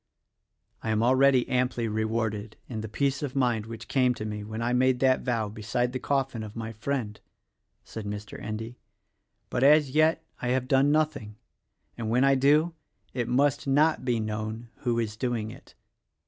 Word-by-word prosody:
"I 110 - -4
am 110 0 +2
already 130 +1 +4
amply 125 -2 0
rewarded, 110 -1 -2
in 110 -3 -5
the 110 - -6
peace 140 +4 0
of 140 -3 -4
mind 120 -5 +1
which 115 0 -8
came 125 -2 +2
to 110 - -5
me 105 -1 -4
when 110 +1 -6
I 120 +1 0
made 130 0 +3
that 130 -1 +4
vow 115 -4 -1
beside 110 +4 -2
the 130 - -2
coffin 135 -4 -1
of 110 -1 -8
my 115 -1 -5
friend," 110 -2 -3 0.6
said 110 -2 -8
Mr. 105 0 -6
Endy; 110 +3 -6 0.7
"but 125 - -1
as 145 0 +5
yet 160 +2 +3 0.2
I 120 - -2
have 130 +1 0
done 135 +2 +4
nothing, 150 -9 0 0.6
and 110 -2 -2
when 125 +3 +3
I 135 0 +5
do, 150 +5 +3 0.4
it 120 -2 -2
must 140 +3 +1
not 150 +4 +3
be 120 -2 +1
known 110 +2 -4
who 120 -1 -1
is 110 -2 -1
doing 115 -2 -2
it. - - -15
120 Hz, 175 wpm, -27 LUFS, 110-135 Hz, 0.7 s, as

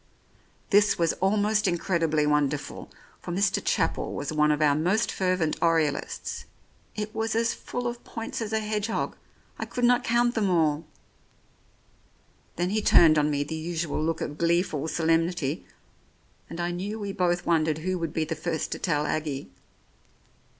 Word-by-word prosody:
This 205 +1 +5
was 165 -1 +2
almost 210 +2 +2
incredibly 165 -4 +1
wonderful, 150 -1 -1 0.3
for 175 - -6
Mr. 195 +3 +1
Chapel - - 0
was 145 +2 -3
one 150 0 +3
of 150 - +1
our 150 -2 +4
most 180 +9 +1
fervent 185 -4 0
Oriolists. 160 -4 0 0.5
It 215 0 -4
was 220 0 -1
as 230 +1 +2
full 245 0 -5
of 240 0 -4
points 225 +1 -5
as 220 -1 -3
a 220 0 +1
hedgehog; 215 +1 -2 0.4
I - - -2
could 245 - -4
not 245 0 +4
count 240 +1 +2
them 215 -5 +1
all 160 -3 +2 1.7
Then 175 +2 -1
he 215 +1 +1
turned 160 -6 +6
on 150 0 +2
me 145 -1 0
the 150 - -6
usual 160 -1 -2
look 165 0 -1
of 150 - -4
gleeful 170 -3 +1
solemnity, 165 -2 0 0.8
and 170 - -7
I 175 0 -1
knew 195 +5 -4
we 200 -2 -4
both 175 -1 0
wondered 155 -2 +2
who 185 -1 0
would 165 -2 -2
be 160 0 -1
the 160 - -3
first 160 0 -3
to - - -3
tell 150 -4 0
Aggie. 150 -5 -3
170 Hz, 160 wpm, -27 LUFS, 155-205 Hz, 1.7 s, turned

